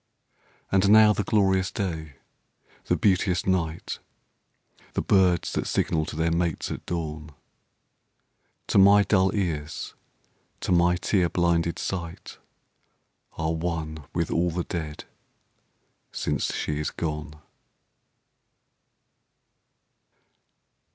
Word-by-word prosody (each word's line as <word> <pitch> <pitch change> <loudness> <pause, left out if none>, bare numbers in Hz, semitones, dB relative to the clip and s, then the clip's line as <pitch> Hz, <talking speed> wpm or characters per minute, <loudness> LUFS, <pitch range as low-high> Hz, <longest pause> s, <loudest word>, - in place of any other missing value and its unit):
And 95 +1 +3
now 110 0 +7
the 105 - -1
glorious 95 -2 +2
day, 80 -7 -4 0.7
the - - +2
beauteous 95 -2 +2
night, 85 -4 -1 0.9
The - - -1
birds 90 -4 +3
that - - -2
signal 80 -1 0
to - - -6
their 80 +1 +1
mates 85 -1 -1
at - - -5
dawn, 75 -3 -5 1.3
To - - +3
my 100 +1 +7
dull 95 -2 +3
ears, 80 -6 -3 0.7
to - - -2
my 90 0 +4
tear 90 0 +1
blinded 85 -1 +1
sight 85 -3 -5 0.9
Are 80 0 -2
one 80 -2 -3
with 85 -1 -2
all 85 +1 +1
the 85 +1 -2
dead, 80 -4 -5 1.1
since - - -1
she 75 0 -2
is 75 - -1
gone. 75 -2 -4
85 Hz, 105 wpm, -26 LUFS, 80-95 Hz, 1.3 s, now